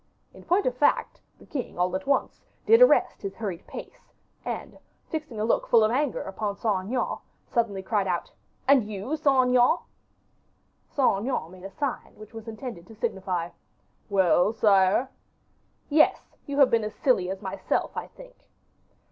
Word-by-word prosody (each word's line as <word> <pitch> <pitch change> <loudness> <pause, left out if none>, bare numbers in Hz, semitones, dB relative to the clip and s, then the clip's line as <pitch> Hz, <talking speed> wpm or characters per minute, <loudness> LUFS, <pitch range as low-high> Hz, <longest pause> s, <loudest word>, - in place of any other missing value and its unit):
In - - -14
point 375 +4 +2
of 250 - 0
fact, 290 - +1 0.2
the - - -17
king, 260 -10 -5
all 180 +1 +1
at 190 - -4
once, 280 - 0 0.2
did 455 +2 +6
arrest - - +5
his 195 -1 -5
hurried 195 -7 -5
pace; - - -10 0.3
and, - - -6 0.3
fixing 305 -8 -4
a 215 - 0
look 230 - +1
full 230 -2 +5
of 215 - +2
anger 275 +2 0
upon 200 +1 -4
Saint 195 -5 -1
Aignan, 250 +3 -1 0.3
suddenly 210 -6 -1
cried 200 -1 0
out: 175 -2 -2 0.4
"And 265 -6 +4
you, 210 +8 -3
Saint 270 -4 +3
Aignan?" 250 +6 +4 1.1
Saint 255 -8 +2
Aignan 205 -8 -3
made 185 0 -13
a - - -5
sign 280 +5 -4
which 215 +2 -13
was 225 0 -9
intended 220 -5 -7
to 225 - -13
signify, 190 -6 -2 0.6
"Well, 190 +1 +3
sire?" 205 +2 +3 0.8
"Yes; 305 +1 +2
you 285 0 -3
have 275 -3 +6
been 230 -1 +3
as 210 - -5
silly 195 -9 +2
as 190 +2 -5
myself, 190 0 -2
I - - -4
think." - - -17
220 Hz, 165 wpm, -26 LUFS, 195-260 Hz, 1.1 s, did